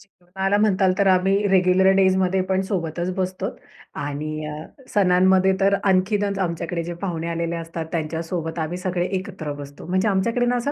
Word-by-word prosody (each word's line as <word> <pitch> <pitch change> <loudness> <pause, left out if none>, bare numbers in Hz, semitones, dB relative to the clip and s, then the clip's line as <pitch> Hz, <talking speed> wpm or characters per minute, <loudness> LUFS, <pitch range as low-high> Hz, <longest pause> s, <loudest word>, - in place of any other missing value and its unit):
जेवणाला 190 +1 -3
म्हणाल 195 -3 +3
तर 200 - +3
आम्ही 195 +2 +3
रेग्युलर 190 0 +4
डेजमध्ये 190 -1 +3
पण 190 0 +2
सोबतच 175 -1 -2
बसतो 185 -1 -3 0.5
आणि 155 +2 -4
अ, 150 - -5 0.4
सणांमध्ये 190 0 +4
तर 195 +1 +3
आणखीनच 200 +1 +1
आमच्याकडे 170 -1 -2
जे 175 +1 -5
पाहुणे 170 -4 -3
आलेले 170 0 -2
असतात, 165 0 -5
त्यांच्यासोबत 165 +1 -3
आम्ही 160 +2 -3
सगळे 180 -1 -1
एकत्र 185 -6 -6
बसतो. 140 0 -10
म्हणजे 185 +3 +1
आमच्याकडे 230 +5 +1
ना, 245 0 +1
अ, - - +2
185 Hz, 155 wpm, -22 LUFS, 170-190 Hz, 0.5 s, रेग्युलर